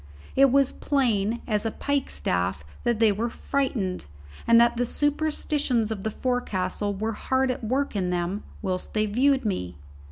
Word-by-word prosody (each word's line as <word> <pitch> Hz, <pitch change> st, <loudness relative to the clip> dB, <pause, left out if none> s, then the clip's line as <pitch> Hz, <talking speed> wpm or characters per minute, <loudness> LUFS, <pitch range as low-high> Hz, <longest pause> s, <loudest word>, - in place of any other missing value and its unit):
It 275 Hz, -1 st, +6 dB
was 275 Hz, 0 st, +4 dB
plain 235 Hz, -5 st, 0 dB
as 210 Hz, -3 st, +1 dB
a 225 Hz, -, 0 dB
pikestaff 285 Hz, +5 st, -1 dB, 0.2 s
that 240 Hz, -2 st, +2 dB
they 220 Hz, -1 st, +4 dB
were 225 Hz, +4 st, -1 dB
frightened, 230 Hz, -, -2 dB, 0.4 s
and 230 Hz, 0 st, +7 dB
that 235 Hz, 0 st, +4 dB
the 245 Hz, -, +2 dB
superstitions 290 Hz, -5 st, 0 dB
of 210 Hz, -3 st, -3 dB
the 220 Hz, -, -1 dB
forecastle 205 Hz, -5 st, -1 dB
were 220 Hz, +3 st, -2 dB
hard 260 Hz, +4 st, 0 dB
at 250 Hz, -, -6 dB
work 260 Hz, +3 st, -1 dB
in 185 Hz, -3 st, 0 dB
them 180 Hz, +3 st, -1 dB, 0.2 s
whilst 185 Hz, +1 st, -3 dB
they 215 Hz, 0 st, +2 dB
viewed 265 Hz, +5 st, +2 dB
me. 90 Hz, -, -2 dB
230 Hz, 160 wpm, -26 LUFS, 205-265 Hz, 0.4 s, and